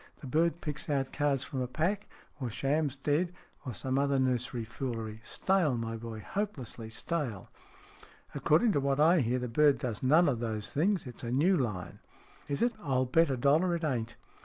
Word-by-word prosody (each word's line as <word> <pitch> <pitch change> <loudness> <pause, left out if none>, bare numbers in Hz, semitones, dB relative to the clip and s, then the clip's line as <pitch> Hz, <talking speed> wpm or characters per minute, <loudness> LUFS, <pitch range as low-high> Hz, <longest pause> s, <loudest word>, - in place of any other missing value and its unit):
The - - -8
bird 160 +4 +1
picks 150 +1 -4
out 135 -2 0
cards 145 -3 +1
from 135 -4 -4
a 125 - -1
pack, 175 +10 -1 0.3
or 130 -3 -2
shams 140 +4 0
dead, 155 +6 0 0.3
or - - -2
some 130 +8 -1
other 140 0 +2
nursery 125 -2 0
foolery. 115 -3 -5
Stale, 175 - +1
my 115 0 -3
boy, 115 -1 -7
hopelessly 135 - -4
stale." 115 - -3 0.4
" - - -23
According 165 +10 +3
to 145 - +2
what 140 0 0
I 165 +3 +6
hear, 125 -1 +1
the 125 0 -3
bird 140 +3 +4
does 115 -3 -4
none 155 +6 +5
of 130 -5 +1
those 110 -3 -3
things. 175 +5 +1
It's 125 -2 -9
a 120 - -3
new 155 +10 +3
line." 105 - -3 0.3
" - - -26
Is 140 +6 0
it? 240 0 +2
I'll 130 -5 +1
bet 165 +5 +3
a 135 - 0
dollar 155 +8 +3
it 170 - -4
ain't. 120 -6 -1
135 Hz, 195 wpm, -31 LUFS, 120-155 Hz, 0.4 s, I